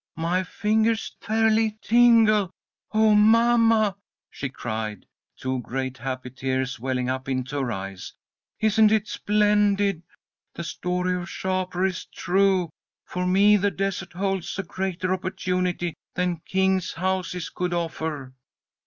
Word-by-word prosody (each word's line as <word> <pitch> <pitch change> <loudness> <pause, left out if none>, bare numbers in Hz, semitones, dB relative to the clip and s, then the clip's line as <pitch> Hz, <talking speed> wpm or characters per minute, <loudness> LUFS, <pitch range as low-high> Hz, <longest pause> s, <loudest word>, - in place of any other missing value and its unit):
My 170 +3 0
fingers 220 +4 0
fairly 220 0 +1
tingle. 225 -4 +5 0.4
Oh, 220 0 +4
mamma!" 225 -1 +4 0.4
she 140 - -4
cried, 110 -5 -5 0.3
two 130 0 -2
great 130 +2 -4
happy 130 0 -5
tears 130 -1 -2
welling 125 0 -1
up 130 +1 -3
into 130 +2 -2
her 125 -3 -2
eyes. 95 -2 -6 0.5
"Isn't 215 0 +4
it 215 -1 +2
splendid? 205 -3 +2 0.5
The 170 - -5
story 180 +2 -2
of 180 +1 -6
Shapur 185 -1 -1
is 185 -3 -2
true! 190 -2 +1 0.3
For 180 0 -3
me 200 +3 +5
the 205 +1 +1
desert 195 -2 -3
holds 195 0 -2
a 195 - -2
greater 185 0 -2
opportunity 180 -2 -2 0.2
than 180 -1 0
kings' 190 -1 +1
houses 180 -1 -2
could 180 0 -2
offer!" 160 -5 -3
185 Hz, 125 wpm, -25 LUFS, 145-210 Hz, 0.5 s, tingle